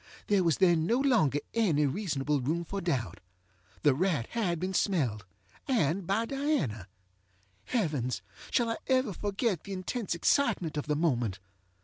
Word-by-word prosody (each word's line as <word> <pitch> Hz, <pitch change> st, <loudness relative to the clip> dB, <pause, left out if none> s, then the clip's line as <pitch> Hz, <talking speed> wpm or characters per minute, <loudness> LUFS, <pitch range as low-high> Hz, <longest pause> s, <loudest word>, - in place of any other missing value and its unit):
There 200 Hz, -3 st, +3 dB
was 165 Hz, -4 st, +2 dB
then 170 Hz, -3 st, +3 dB
no 235 Hz, -, +3 dB
longer 240 Hz, -, +3 dB, 0.2 s
any 170 Hz, -11 st, +2 dB
reasonable 145 Hz, -3 st, -1 dB
room 165 Hz, +7 st, -1 dB
for 200 Hz, +3 st, -4 dB
doubt. 125 Hz, -, -2 dB, 0.6 s
The 145 Hz, -3 st, +5 dB
rat 155 Hz, -5 st, 0 dB
had 185 Hz, -8 st, 0 dB
been 185 Hz, +2 st, -2 dB
smelledŌĆöand 140 Hz, -, -1 dB
by 215 Hz, +4 st, +1 dB
Diana. 230 Hz, -, -1 dB, 0.8 s
Heavens! 150 Hz, -, -1 dB, 0.3 s
shall 235 Hz, -2 st, +1 dB
I -, -, -2 dB
ever 255 Hz, -5 st, +2 dB
forget 205 Hz, -, -1 dB
the 200 Hz, -, -6 dB
intense 190 Hz, +1 st, -3 dB
excitement 185 Hz, -, +1 dB
of 150 Hz, 0 st, -3 dB
the 150 Hz, -, +1 dB
moment? 120 Hz, -, 0 dB
170 Hz, 140 wpm, -30 LUFS, 145-215 Hz, 0.8 s, The